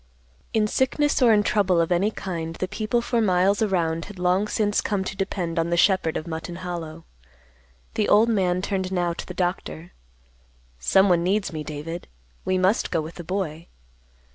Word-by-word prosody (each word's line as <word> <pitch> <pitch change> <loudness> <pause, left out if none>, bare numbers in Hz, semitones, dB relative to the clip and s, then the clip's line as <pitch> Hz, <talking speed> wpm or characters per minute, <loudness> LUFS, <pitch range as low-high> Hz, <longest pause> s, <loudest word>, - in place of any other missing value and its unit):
In 220 -1 +2
sickness 265 +6 +1
or 240 -2 +6
in 210 -1 +4
trouble 195 -4 +2
of 165 +1 +1
any 180 +4 +3
kind 165 -6 -5
the 185 - -3
people 215 +4 -1
for 235 -1 +1
miles 195 0 +2
around 170 -6 0
had 205 -1 -11
long 180 +3 +1
since 210 -1 +1
come 200 -2 -1
to 195 - -5
depend 180 -4 -2
upon 165 +1 0
the 170 - +1
shepherd 185 -3 +3
of 155 - -5
Mutton 165 +1 -5
Hollow. 165 -2 -6 0.9
The 215 - 0
old 215 +3 +6
man 185 -5 +1
turned 190 -2 -2
now 175 -2 0
to - - -7
the 180 - -7
doctor. 175 -2 -3 0.9
"Someone 180 - +4
needs 195 +1 0
me, 155 -1 -4
David. 155 +3 -6 0.4
We 185 - +1
must 185 +4 +2
go 170 - 0
with 160 +2 -5
the 175 - -8
boy." 170 -3 -4
185 Hz, 180 wpm, -24 LUFS, 170-205 Hz, 0.9 s, or